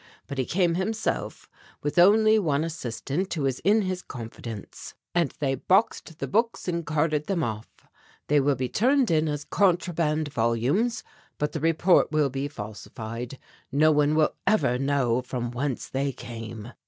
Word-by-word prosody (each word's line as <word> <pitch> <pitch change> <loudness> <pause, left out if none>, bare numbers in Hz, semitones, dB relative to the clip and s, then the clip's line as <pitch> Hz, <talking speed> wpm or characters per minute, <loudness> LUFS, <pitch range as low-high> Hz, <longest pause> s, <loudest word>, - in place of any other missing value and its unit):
But 140 -2 -6
he 130 - +1
came 175 -1 +2
himself 215 +5 -2 0.4
with 145 +4 0
only 215 +4 +6
one 155 -6 +1
assistant 155 +2 -3
who 150 -4 -1
is 130 -1 -1
in 210 +2 +3
his 185 -1 -2
confidence, 115 -3 -8 0.2
and 170 -4 +2
they 135 -2 0
boxed 175 - +1
the - - -4
books 230 +1 0
and 170 -1 -1
carted 150 0 0
them 185 -5 0
off. 110 -1 -4 0.6
They 145 0 +3
will 140 0 +2
be 130 0 -2
turned 255 - +2
in 160 -1 +2
as 145 -1 -3
contraband 170 -5 +1
volumes, 130 - +1 0.3
but 150 - -1
the 160 - -3
report 165 +3 +3
will 150 -3 +2
be 135 +2 -2
falsified; 115 +1 -7 0.3
no 155 +3 +4
one 150 0 +3
will 155 -1 +3
ever 190 - +2
know 135 -3 +1
from 125 -1 -4
whence 130 +1 -3
they 135 +1 -1
came." 115 -2 -8
150 Hz, 160 wpm, -26 LUFS, 130-175 Hz, 0.6 s, only